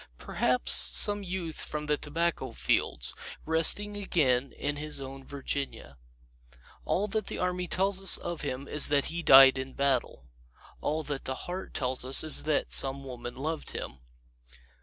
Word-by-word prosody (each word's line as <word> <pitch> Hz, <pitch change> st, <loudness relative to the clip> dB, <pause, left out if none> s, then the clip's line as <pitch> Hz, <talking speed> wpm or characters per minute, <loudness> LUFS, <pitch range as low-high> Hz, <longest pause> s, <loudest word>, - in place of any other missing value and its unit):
Perhaps 125 Hz, -, -1 dB
some 205 Hz, 0 st, +4 dB
youth 180 Hz, -4 st, -6 dB
from 150 Hz, 0 st, -5 dB
the 150 Hz, 0 st, +1 dB
tobacco 165 Hz, +4 st, -3 dB
fields, -, -, -1 dB, 0.3 s
resting 165 Hz, +6 st, +5 dB
again 140 Hz, -10 st, 0 dB
in 145 Hz, 0 st, -4 dB
his 150 Hz, -1 st, 0 dB
own 135 Hz, 0 st, -9 dB
Virginia. 140 Hz, -, -5 dB, 0.9 s
All 205 Hz, +3 st, -1 dB
that 215 Hz, +1 st, -3 dB
the -, -, -5 dB
Army 180 Hz, 0 st, -2 dB
tells 190 Hz, +2 st, 0 dB
us 195 Hz, -, +6 dB
of 175 Hz, -2 st, -6 dB
him 140 Hz, -1 st, -5 dB
is 150 Hz, -, +3 dB
that 145 Hz, -1 st, +1 dB
he 170 Hz, -, -3 dB
died 135 Hz, -3 st, +7 dB
in 130 Hz, 0 st, -7 dB
battle. 135 Hz, -, -1 dB, 0.5 s
All 155 Hz, +1 st, -3 dB
that 145 Hz, -2 st, -6 dB
the 130 Hz, -, -3 dB
heart 180 Hz, +2 st, -7 dB
tells 130 Hz, -2 st, -1 dB
is 135 Hz, +5 st, +2 dB
that 155 Hz, -1 st, -1 dB
some 135 Hz, 0 st, 0 dB
woman 120 Hz, -2 st, -8 dB
loved 155 Hz, +4 st, -5 dB
him. 65 Hz, +2 st, -7 dB
150 Hz, 155 wpm, -28 LUFS, 135-170 Hz, 0.9 s, died